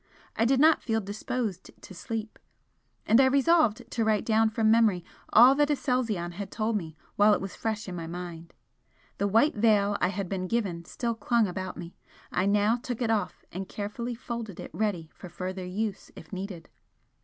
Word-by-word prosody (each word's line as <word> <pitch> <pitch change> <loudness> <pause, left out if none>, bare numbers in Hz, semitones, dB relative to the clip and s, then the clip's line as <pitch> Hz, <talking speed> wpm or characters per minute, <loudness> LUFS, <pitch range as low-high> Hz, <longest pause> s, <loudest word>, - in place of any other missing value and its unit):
I 225 - +2
did 260 +2 +3
not 315 +2 +5
feel 225 -2 0
disposed 210 0 -4
to - - -12
sleep, 220 +4 -5 0.7
and 225 +5 +5
I 265 - +5
resolved 280 -3 +3
to 230 - 0
write 215 -1 +1
down 220 0 +3
from 220 0 +2
memory 215 -6 +3 0.3
all 245 +4 +8
that 290 +1 +2
Aselzion 240 -11 0
had 195 +3 -6
told 220 0 -1
me 160 -6 -4 0.2
while 205 0 +6
it - - -3
was 195 -1 -6
fresh 220 -2 -3
in 185 - -5
my 165 -1 -5
mind. 170 -1 -7 0.7
The 200 - +1
white 225 +9 +3
veil 205 -2 +3
I - - +4
had 195 0 -3
been 185 0 -3
given 185 -7 -2
still 235 +6 -3
clung 230 +1 +1
about 185 0 -5
me, 170 0 -8 0.4
I 185 +2 +1
now 210 +3 +3
took 245 -1 -5
it 235 -3 0
off 205 -5 -2
and 190 +2 -6
carefully 235 +4 -4
folded 230 -5 -6
it - - -8
ready 185 -7 -2
for 180 - -11
further 185 +1 -5
use 205 +2 -3
if - - -13
needed. 185 -3 -6
210 Hz, 190 wpm, -28 LUFS, 185-230 Hz, 0.7 s, all